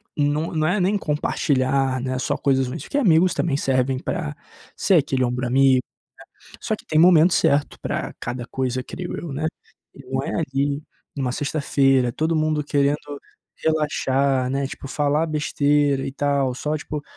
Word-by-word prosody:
não 145 +2 0
não 155 0 +1
é 190 +3 +1
nem 190 +3 +2
compartilhar, 135 -4 0
né, 130 0 -2
só - - -1
coisas 135 -2 +1
ruins, 125 - -6
porque 285 - -3
amigos 180 - +4
também 140 -5 0
servem 130 -1 +1
pra 150 +1 -4 0.4
ser 190 - +2
aquele 135 -4 +2
ombro 125 0 -1
amigo, 130 0 +4 0.7
né, - - -13
só - - -1
que - - -10
tem 155 - +1
momento 170 0 +6
certo 145 +1 +2
para - - -3
cada 120 0 -5
coisa, 130 0 -2
creio 180 +5 -6
eu, 165 -5 -6
né. 155 +3 -2 0.6
Não - - -1
é - - -4
ali, 140 +2 -1 0.3
em - - -4
uma 125 -2 -1
sexta-feira, 135 -3 +1
todo 160 +4 0
mundo 155 -1 0
querendo 145 0 +2 0.7
relaxar, 140 -4 +1
né, 135 0 -1
tipo 135 - -8
falar 150 +3 +1
besteira 145 -2 +1
e 135 - -4
tal, 140 -2 0
só 150 +3 -2
tipo, 150 0 -5
140 Hz, 170 wpm, -22 LUFS, 130-155 Hz, 0.7 s, momento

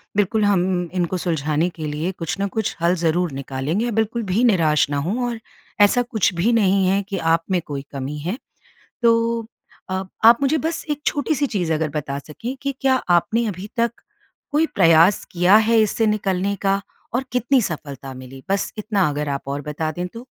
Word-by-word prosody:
बिल्कुल 210 +2 +2
हम 180 -3 +1
इनको 180 0 -1
सुलझाने 160 -1 0
के 160 -3 -7
लिए 150 +5 -2
कुछ 165 -5 -4
न 200 - +1
कुछ 220 +1 -2
हल 170 +2 +3
ज़रूर 170 0 0
निकालेंगे। 140 - -2
बिल्कुल 225 +2 0
भी 200 +4 0
निराश 165 - +3
ना 145 - -1
हों 200 - -1
और 235 -1 -5 0.4
ऐसा 225 +5 +4
कुछ 230 -5 0
भी 175 +7 +1
नहीं 195 -3 +3
है 195 +2 +2
कि 195 - -2
आप 165 -1 +2
में 180 -2 +2
कोई 140 -2 -4
कमी 140 +1 -5
है। 175 +10 -3 0.7
तो 230 -1 +2 0.4
अ, 190 0 -1 0.2
आप 230 +1 +8
मुझे 280 +3 +3
बस 325 +3 -3
एक 295 -1 -1
छोटी-सी 285 +1 +1
चीज़ 180 -10 -1
अगर 160 0 0
बता 140 -2 -3
सकें 190 - -7
कि, 280 0 -1
क्या 265 -1 +3 0.2
आपने 220 +7 +3
अभी 195 +1 -6
तक 235 0 +2 0.6
कोई 310 +2 +3
प्रयास 165 +1 +5
किया 180 +3 +5
है, 225 +1 +4
इससे 220 +1 +1
निकलने 200 -2 0
का 195 0 +2 0.3
और 255 +2 0
कितनी 250 +2 +2
सफलता 140 - -5
मिली? 130 +1 -11
बस 200 0 0
इतना 205 -4 +1
अगर 150 0 -3
आप 140 -1 -2
और 140 +1 -3
बता 155 +1 -2
दें 175 +3 -4
तो। 230 +6 -11
190 Hz, 190 wpm, -21 LUFS, 160-225 Hz, 0.7 s, आप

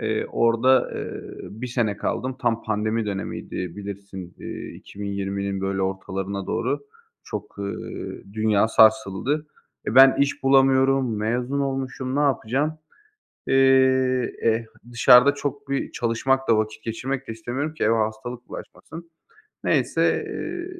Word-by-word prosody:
Eee, 110 0 -1
orada, 115 +2 +4
ııı, - - -7
1 115 +5 -7
sene 115 -4 -1
kaldım. 130 +4 -3
Tam 115 -3 0
pandemi 110 +1 -1
dönemiydi 100 -1 -5 0.2
bilirsin, 100 -3 -8
iii, - - -7
2020'nin 100 -1 -4
böyle 95 0 -1
ortalarına 95 0 -3
doğru - - -1 0.4
çok, - - -7
ııı, 100 0 -6
dünya 110 0 +2
sarsıldı. 110 +7 +3 0.4
E, 110 - -2
ben 135 0 +8
iş 140 0 0
bulamıyorum, 135 -2 +4
mezun 125 +6 -1
olmuşum. 135 -1 -3
Ne - - +2
yapacağım? 140 +3 0 0.7
Eee, 135 - +2 0.9
eee, 115 0 +2 0.3
dışarıda 125 +4 +7
çok 140 -1 -5
bir 140 - -2
çalışmak 130 +3 0
da 115 -2 +4
vakit 110 0 -2
geçirmek 130 +4 -4
de - - -4
istemiyorum 125 +7 -4
ki - - -3
eve 115 +2 +3
hastalık 120 +2 -3
bulaşmasın. 165 +1 -10 0.5
Neyse, - - +2
eee, 350 0 -5
115 Hz, 125 wpm, -24 LUFS, 105-135 Hz, 0.9 s, ben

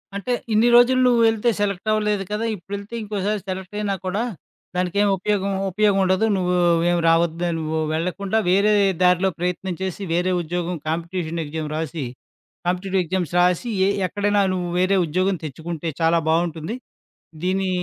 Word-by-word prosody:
అంటే 245 +5 -2 0.2
ఇన్ని 225 +3 +4
రోజులు 245 +2 +6
నువ్వెళ్తే 230 -1 +3
సెలెక్టవ్వలేదు 210 +1 0
కదా! 215 +2 -1
ఇప్పుడెళ్తే 200 +4 -8
ఇంకోసారి 205 0 -2
సెలెక్టయినా 195 +2 -3
కూడా, 195 +4 -1 0.5
దానికేం 185 +3 +1
ఉపయోగం, 200 +1 -1 0.2
ఉపయోగం 205 0 +2
ఉండదు. 185 +3 +2
నువ్వు 180 -1 0 0.4
ఏం 175 - +2
రావద్దు. 165 +1 +2
నువ్వు 160 0 -2
వెళ్ళకుండా 185 +6 -1
వేరే 200 +3 +4 0.3
దారిలో 180 +1 +4
ప్రయత్నం 180 +1 -2
చేసి 190 +1 -3
వేరే 180 +2 +1
ఉద్యోగం 175 +2 -3
కాంపిటీషన్ 165 0 -2
ఎగ్జామ్ 155 0 -4
రాసి, 155 -3 -3 0.6
కాంపిటిటివ్ 185 +1 0
ఎగ్జామ్స్ 175 0 -2
రాసి 180 +6 +1 0.2
ఎ - - +3 0.2
ఎక్కడైనా 205 +2 +1
నువ్వు 180 -1 -2
వేరే 185 +2 +3
ఉద్యోగం 185 +4 0
తెచ్చుకుంటే 160 +3 -5
చాలా 165 +1 +4
బావుంటుంది. 165 +4 0 0.7
దీని 190 +1 0
185 Hz, 135 wpm, -22 LUFS, 170-205 Hz, 0.7 s, రోజులు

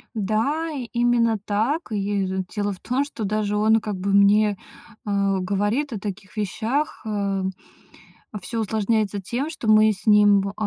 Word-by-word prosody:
Да, 225 +11 0 0.2
именно 235 -2 +2
так. 230 +10 -1
И, 200 -1 -1
д 190 0 -2
дело 205 0 -1
в 185 - -13
том, 255 +3 -1
что 280 -6 -7
даже 210 0 -1
он 220 +1 +4
как 210 -2 -4
бы 195 +2 -2
мне, 205 +1 +5 0.5
э, 200 -1 +1
говорит 205 +9 -1
о 210 - -4
таких 200 -1 -7
вещах, 225 +8 -2
э. 200 -2 -1 1.0
Всё 230 +5 -4
усложняется 215 -1 0
тем, 245 - -3
что 310 -8 -6
мы 215 0 +6
с 205 +1 -8
ним 205 -1 +5
в, 195 - -3
э, - - -8
210 Hz, 165 wpm, -23 LUFS, 200-230 Hz, 1.0 s, мы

